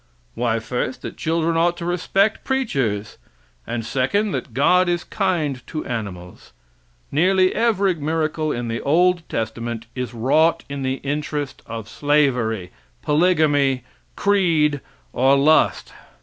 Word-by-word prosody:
Why, 115 Hz, -1 st, 0 dB
first, 125 Hz, +3 st, -3 dB
that -, -, -6 dB
children 165 Hz, 0 st, 0 dB
ought 170 Hz, +1 st, +2 dB
to 170 Hz, -, -5 dB
respect 190 Hz, +4 st, +1 dB
preachers, 135 Hz, -, -1 dB, 0.5 s
and 115 Hz, -2 st, -3 dB
second, 140 Hz, -, 0 dB
that 135 Hz, -, -4 dB
God 180 Hz, +9 st, +3 dB
is 175 Hz, 0 st, 0 dB
kind 165 Hz, -, -1 dB
to 155 Hz, -, -5 dB
animals. 100 Hz, -8 st, -6 dB, 0.6 s
Nearly 185 Hz, +4 st, +3 dB
every 205 Hz, -4 st, +2 dB
miracle 155 Hz, 0 st, -1 dB
in 120 Hz, -2 st, -3 dB
the 115 Hz, 0 st, -3 dB
old 175 Hz, +4 st, +3 dB
testament 115 Hz, +1 st, -4 dB
is 125 Hz, -1 st, -4 dB
wrought 155 Hz, +8 st, +2 dB
in 140 Hz, -1 st, -5 dB
the 130 Hz, 0 st, -1 dB
interest 145 Hz, -1 st, -3 dB
of 115 Hz, -1 st, -6 dB
slavery, 125 Hz, -, +1 dB, 0.3 s
polygamy, 150 Hz, -5 st, +2 dB, 0.3 s
creed 160 Hz, -8 st, +2 dB, 0.3 s
or 135 Hz, +2 st, +4 dB
lust. 155 Hz, +3 st, +3 dB
145 Hz, 125 wpm, -21 LUFS, 125-175 Hz, 0.6 s, or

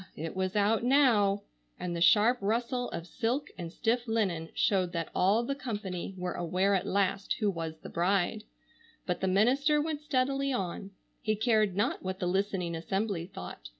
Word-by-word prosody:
It 160 Hz, +3 st, -5 dB
was 185 Hz, +1 st, -1 dB
out 210 Hz, +2 st, +2 dB
now! 230 Hz, -7 st, +4 dB, 0.4 s
and 175 Hz, -1 st, -3 dB
the 170 Hz, -, -3 dB
sharp 215 Hz, +8 st, +5 dB
rustle 235 Hz, +4 st, -1 dB
of 165 Hz, -, -5 dB
silk 245 Hz, +8 st, -2 dB
and 170 Hz, -2 st, -6 dB
stiff 240 Hz, +5 st, 0 dB
linen 190 Hz, -8 st, 0 dB
showed 185 Hz, -3 st, +1 dB
that 165 Hz, -2 st, -2 dB
all 205 Hz, +5 st, +3 dB
the 275 Hz, -, -1 dB
company 205 Hz, -9 st, -5 dB
were 180 Hz, 0 st, -3 dB
aware 185 Hz, +3 st, +1 dB
at 190 Hz, -, 0 dB
last 195 Hz, 0 st, +1 dB
who 210 Hz, -3 st, 0 dB
was 165 Hz, -3 st, -5 dB
the -, -, -10 dB
bride; 195 Hz, +4 st, +1 dB, 0.6 s
but 180 Hz, -, -2 dB
the 190 Hz, -, +1 dB
minister 265 Hz, +10 st, +3 dB
went 300 Hz, -1 st, -2 dB
steadily 275 Hz, -1 st, 0 dB
on. 195 Hz, -4 st, -3 dB, 0.3 s
He 215 Hz, -2 st, 0 dB
cared 215 Hz, -3 st, +2 dB
not 205 Hz, +7 st, 0 dB
what 185 Hz, 0 st, -4 dB
the 185 Hz, -, -3 dB
listening 185 Hz, -1 st, 0 dB
assembly 190 Hz, +1 st, -2 dB
thought. -, -, -9 dB
200 Hz, 175 wpm, -30 LUFS, 180-235 Hz, 0.6 s, sharp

